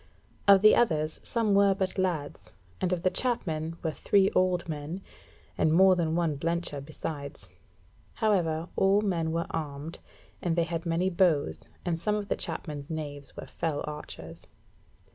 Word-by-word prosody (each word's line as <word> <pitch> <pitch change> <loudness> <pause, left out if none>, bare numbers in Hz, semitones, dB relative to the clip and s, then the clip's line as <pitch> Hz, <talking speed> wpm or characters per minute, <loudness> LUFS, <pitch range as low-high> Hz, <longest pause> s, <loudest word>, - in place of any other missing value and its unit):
Of 200 0 +7
the 215 - +8
others, 155 -8 +1
some 225 -3 0
were 200 -1 +5
but 190 0 -2
lads, 170 -6 -3 0.3
and 185 - +1
of 180 -1 -1
the 185 - +3
Chapmen 165 -10 -1
were 160 - 0
three 195 +4 +3
old 185 -2 +1
men, 155 +4 -5 0.6
and 155 - +3
more 185 +3 +6
than 165 -2 0
one 165 -4 0
blencher 165 -3 -2
besides. 140 - -6 0.7
However, 170 -7 +1
all 195 +2 +4
men 170 -6 0
were 165 +1 -1
armed, 150 0 -4 0.4
and 170 -2 0
they 170 - +3
had 165 0 -3
many 175 +3 +1
bows, 170 -5 +2 0.3
and 170 -2 -1
some 210 +4 0
of 205 -2 -4
the - - +1
chapmen's 150 -3 -5
knaves 145 -3 -6
were - - -6
fell 155 -3 -3
archers. 85 - -8
165 Hz, 160 wpm, -28 LUFS, 155-185 Hz, 0.7 s, the